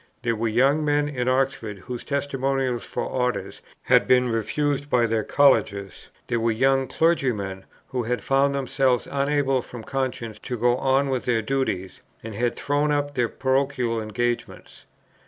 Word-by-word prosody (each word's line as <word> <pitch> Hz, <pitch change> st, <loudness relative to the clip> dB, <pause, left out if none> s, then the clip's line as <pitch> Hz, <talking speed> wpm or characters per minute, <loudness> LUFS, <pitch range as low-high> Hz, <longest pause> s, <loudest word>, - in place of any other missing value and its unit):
There 115 Hz, -1 st, +1 dB
were 115 Hz, +1 st, -1 dB
young 135 Hz, +7 st, +3 dB
men 145 Hz, 0 st, +2 dB
in 125 Hz, -4 st, -3 dB
Oxford, 130 Hz, -5 st, 0 dB
whose 120 Hz, +6 st, -7 dB
testimonials 135 Hz, -3 st, -1 dB
for -, -, -3 dB
Orders 125 Hz, -6 st, -2 dB, 0.2 s
had -, -, +4 dB
been 125 Hz, -1 st, +4 dB
refused 145 Hz, +5 st, -1 dB
by 120 Hz, -3 st, +3 dB
their 110 Hz, -1 st, 0 dB
Colleges; 100 Hz, -10 st, +2 dB, 0.2 s
there 120 Hz, -, -1 dB
were 115 Hz, +1 st, +1 dB
young 135 Hz, +3 st, +2 dB
clergymen, 115 Hz, -, 0 dB, 0.2 s
who 130 Hz, -2 st, -2 dB
had 120 Hz, +1 st, -2 dB
found 140 Hz, +1 st, +2 dB
themselves 135 Hz, -2 st, +1 dB
unable 140 Hz, -2 st, +1 dB
from 120 Hz, -1 st, -10 dB
conscience 125 Hz, -4 st, -3 dB
to 125 Hz, -, -5 dB
go 120 Hz, +2 st, +3 dB
on 135 Hz, +1 st, +2 dB
with 130 Hz, -2 st, -2 dB
their 115 Hz, -3 st, +1 dB
duties, 110 Hz, -8 st, -2 dB, 0.2 s
and 115 Hz, 0 st, -6 dB
had 120 Hz, +3 st, -1 dB
thrown 145 Hz, +1 st, 0 dB
up 145 Hz, 0 st, 0 dB
their 120 Hz, -4 st, 0 dB
parochial 130 Hz, -4 st, 0 dB
engagements. 120 Hz, +2 st, -4 dB
125 Hz, 155 wpm, -24 LUFS, 115-135 Hz, 0.2 s, had